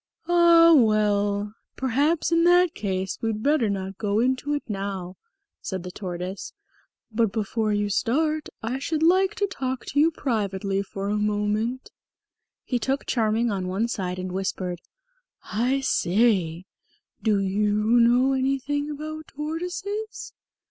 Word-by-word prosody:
"Ah, 340 -1 +6
well, 210 -3 +2 0.2
perhaps 285 +6 +1
in 335 0 +4
that 355 0 +5
case 190 -2 -3
we'd 220 -1 -2
better 280 -6 +2
not 195 -1 -4
go 205 -1 0
into 260 +4 0
it 290 - -3
now," 195 -3 -4 0.5
said 185 -2 -4
the 180 - -7
Tortoise. 180 0 -6 0.6
"But 220 -2 +1
before 215 0 -1
you 205 0 0
start 305 +9 0
I 245 +4 -2
should 315 +3 -1
like 375 +4 +4
to 415 -3 +1
talk 260 -9 -4
to 285 - -1
you 315 +2 +5
privately 200 - -2
for 200 0 -5
a 210 - 0
moment." 210 +4 -1 0.7
He 245 - -1
took 270 +3 -1
Charming 225 0 +1
on 190 -2 -2
one 195 +5 0
side 185 -6 -3
and 185 0 -4
whispered, 185 -2 -3 0.6
"I 255 +5 0
say, 185 -7 +1 0.6
do 210 -2 +2
you 200 +2 0 0.3
know 245 +3 +4
anything 275 +2 -1
about 310 +1 -6
tortoises?" 360 +8 -5
225 Hz, 135 wpm, -25 LUFS, 200-290 Hz, 0.7 s, Ah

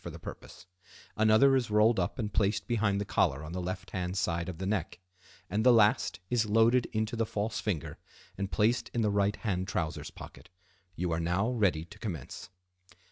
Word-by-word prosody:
for - - -5
the - - -9
purpose; 90 - -10 0.5
another 110 +5 +5
is 125 -4 0
rolled 105 +1 +4
up 90 - -2
and 110 -4 -3
placed 100 -1 +1
behind 105 -4 +1
the 100 - -2
collar 75 -7 +1
on 75 - -7
the 90 - -3
left 90 +1 -5
hand 90 +1 -3
side 85 -1 -1
of 90 - -6
the 95 - -4
neck; 95 -4 -2 0.5
and 105 +3 -1
the 125 - +7
last 105 -5 +3
is 115 -1 +1
loaded 115 +3 +4
into 110 +1 -2
the 115 - +1
false 110 0 -3
finger 90 -9 -3 0.4
and 100 0 -4
placed 115 +4 +1
in 120 - +1
the 105 -2 +2
right 100 0 +1
hand 95 -4 -2
trousers 85 -4 -3
pocket. - - -12 0.5
You 90 0 -2
are 80 - 0
now 90 +7 0
ready 95 -10 +1
to 105 +4 -15
commence. 90 - -6
100 Hz, 195 wpm, -30 LUFS, 90-110 Hz, 0.5 s, the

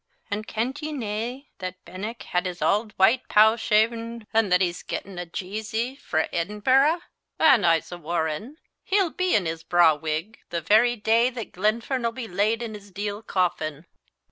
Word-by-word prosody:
An' 210 +1 -2
kent 245 +8 -3
ye 310 0 -4
nae 240 +1 -4
that 185 0 -7
Benenck 200 +7 -6
had 180 +1 -1
his 175 -1 -6
auld 210 +2 +1
white 230 +7 +4
pow 220 +1 +6
shaven, 230 +1 0
an' 220 -2 +3
that 180 0 +4
he's 180 -2 0
gettin' 190 -2 -6
a 175 - -5
jeezy 220 +8 -3
frae 160 - -1
Edinburgh? 255 - +2 0.4
an' 260 - +5
I'se 165 -1 +2
warran' 170 - -3 0.3
he'll 385 -3 +2
be 365 0 +1
in 200 - +2
his 160 0 -3
braw 170 -1 +5
wig 155 +7 -4
the 170 - -2
very 220 +8 +4
day 225 +2 +3
that 240 -3 -7
Glenfern'll 230 +5 0
be 235 -1 -6
laid 215 +5 0
in 225 -2 -5
his 205 -1 -11
deal 205 +2 -4
coffin." 170 -6 -1
210 Hz, 170 wpm, -25 LUFS, 180-235 Hz, 0.4 s, pow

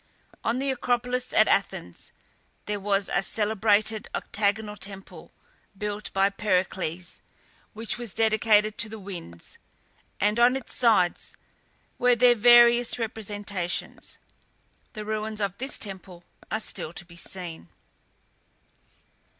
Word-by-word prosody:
On 230 - 0
the 270 +1 0
Acropolis 250 0 -1
at 215 - +5
Athens 90 - -1 0.5
there 205 0 -2
was 195 0 0
a - - +1
celebrated 215 +1 +1
octagonal 210 0 0
temple, 195 -1 -7 0.5
built 210 +1 -4
by 195 0 +3
Pericles, 185 -3 -2 0.5
which 225 +1 -3
was 235 -6 -6
dedicated 215 -1 +3
to 230 - +4
the 220 - -7
winds, 175 - -7 0.6
and 210 +3 +2
on 245 +2 +6
its 265 -4 -6
sides 220 -8 +2 0.6
were 245 0 +4
their 245 +1 +6
various 240 +1 +6
representations. 205 -5 -4 0.8
The 215 -2 -6
ruins 215 0 -3
of 200 -2 -2
this 265 +3 -2
temple 190 -3 -7 0.3
are 220 - -1
still 170 -6 -5
to 175 - -7
be 170 0 -15
seen. 170 - -8
210 Hz, 120 wpm, -26 LUFS, 195-230 Hz, 0.8 s, on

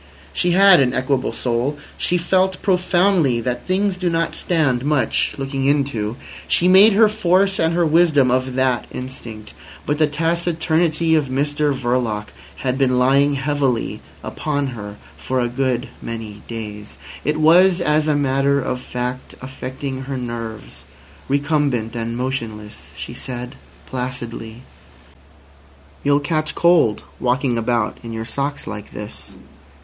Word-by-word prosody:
She 175 -1 +1
had 195 0 +7
an 130 -2 +2
equable 130 0 0
soul. 125 +4 -1 0.2
She 180 - 0
felt 185 +2 +1
profoundly 180 -7 +2
that 120 +1 -3
things 190 +1 +1
do 180 -1 0
not 165 0 0
stand 145 -8 0
much 140 -5 +1
looking 135 -1 -3
into. 135 -6 0 0.3
She 175 - +3
made 195 +4 +7
her 220 +2 +6
force 195 -2 +2
and 165 +1 +2
her 175 -1 +3
wisdom 155 -5 +4
of 130 0 0
that 130 -2 +1
instinct. 115 -4 -8 0.3
But 145 +1 -1
the 155 - +4
taciturnity 165 0 +1
of 155 -3 +2
Mr 145 +3 0
Verloc 120 -5 -1 0.4
had 130 +1 0
been 130 -2 +2
lying 140 +3 +4
heavily 140 -3 -1 0.2
upon 145 -2 -2
her 105 -4 -7 0.2
for 130 0 -2
a 120 - +1
good 125 0 -1
many 110 -3 -7
days. 105 -2 -7 0.3
It 150 +2 0
was, 175 +4 +5
as 150 -2 +2
a 150 - +2
matter 140 0 +2
of 125 -1 -3
fact, 125 0 -5
affecting 130 +1 -6
her 135 0 -4
nerves. 115 -3 -6 0.5
Recumbent 140 -5 0
and 115 0 -3
motionless, 115 -5 -5
she - - -6
said 125 -1 -6 0.3
placidly: 125 -2 -6 1.4
"You'll 145 0 +3
catch 155 +1 -2
cold 170 -11 +3 0.2
walking 125 0 +1
about 115 -1 -1
in 115 - -8
your 115 0 -4
socks 140 +4 -3
like 105 -1 -7
this." 105 0 -8
135 Hz, 140 wpm, -20 LUFS, 120-155 Hz, 1.4 s, had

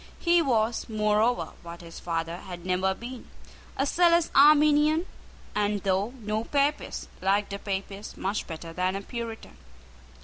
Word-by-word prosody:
He 345 0 +4
was, 235 -6 0
moreover, 215 +2 +1
what 170 0 -9
his 165 -1 -10
father 165 0 -3
had 175 -1 -9
never 185 +1 +1
been, 240 +3 -9 0.5
a 275 - +2
zealous 340 +2 +3
Arminian, 300 +3 +5 0.5
and, 205 -1 0
though 200 +6 0
no 215 +1 -1
Papist, 285 +4 -1
liked 200 +2 +1
a 200 - -4
Papist 195 0 -5
much 195 +2 -2
better 165 0 -7
than 185 +2 0
a 200 - -4
Puritan. 230 0 -7
210 Hz, 140 wpm, -27 LUFS, 190-270 Hz, 0.5 s, Arminian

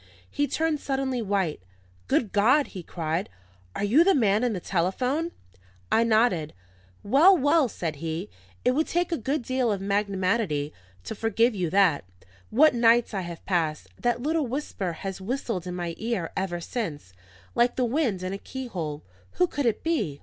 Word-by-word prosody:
He 290 0 0
turned 320 -1 0
suddenly 270 -3 -1
white. 195 - -1 0.5
"Good 215 - +1
God!" 245 +8 +3
he 185 - -7
cried, 165 +1 -3 0.5
"are - - -2
you 245 +11 +5
the 385 +1 +4
man 215 -3 +3
in 245 -2 +1
the 190 - -3
telephone?" 250 - -1 0.6
I 225 - +4
nodded. 215 - +2 0.5
"Well, 315 - +6
well!" 290 0 +3
said 165 -8 -4
he. 165 +5 -4 0.4
"It 250 - +5
would 305 +5 +1
take 350 +1 0
a - - +2
good 270 +4 -1
deal 255 -2 0
of 200 - -1
magnanimity 195 -5 0 0.3
to - - -5
forgive 225 +2 +1
you 180 -5 -1
that. 185 - +3 0.5
What 305 +6 +5
nights 235 -1 +4
I 195 - -1
have 170 -2 -8
passed! 160 -5 -1
That 240 0 0
little 310 -1 0
whisper 230 - -3
has 190 0 -4
whistled 220 -4 -3
in 180 - -4
my 175 -2 -3
ear 220 -7 -2
ever 190 -3 -2
since, 165 - -5 0.4
like 240 +1 +2
the 255 - +1
wind 235 - 0
in 185 +1 -3
a 195 - -5
keyhole. 175 - -5 0.3
Who 180 - +3
could 275 +7 -2
it 225 - 0
be? 215 - -1
215 Hz, 170 wpm, -26 LUFS, 180-260 Hz, 0.6 s, Well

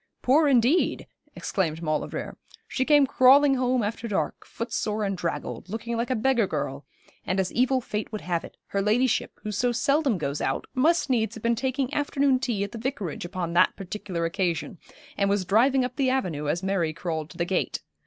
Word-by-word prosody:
'Poor, 295 +5 +4
indeed!' 265 +5 +3 0.3
exclaimed 165 -4 -2
Maulevrier. 155 -1 -3 0.3
'She 260 - -1
came 290 -1 +5
crawling 270 +2 +6
home 255 -2 +1
after 225 +3 -3
dark, 205 - -2
footsore 215 -2 -3
and 195 -1 -1
draggled, 150 -5 -4
looking 230 +3 -4
like 235 +2 -1
a 255 - +1
beggar 235 -2 +2
girl, 135 -4 -4 0.4
and 185 +1 -1
as 190 -1 0
evil 260 +2 +2
fate 215 -1 -4
would 215 - -4
have 170 -2 -2
it, - - -12
her 200 - 0
ladyship, 235 +4 +1
who 215 - -3
so 240 +4 +1
seldom 275 -1 +1
goes 145 -3 -3
out, - - -1
must 305 +4 +2
needs 225 -3 +1
have 225 - -10
been 235 0 +3
taking 260 +2 -1
afternoon 280 -2 +2
tea 230 -6 -1
at 200 - -5
the 230 - -7
Vicarage 220 - -4
upon 175 -1 -4
that 180 +2 +4
particular 190 -3 -4
occasion, 175 0 -2 0.4
and 200 0 +2
was 200 -2 +1
driving 250 +7 +3
up 250 0 -6
the 270 -2 +2
avenue 175 - -1
as 170 +5 -1
Mary 185 -5 0
crawled 160 -2 -4
to 175 - -13
the 170 - 0
gate. 185 +1 -1
220 Hz, 195 wpm, -26 LUFS, 180-255 Hz, 0.4 s, crawling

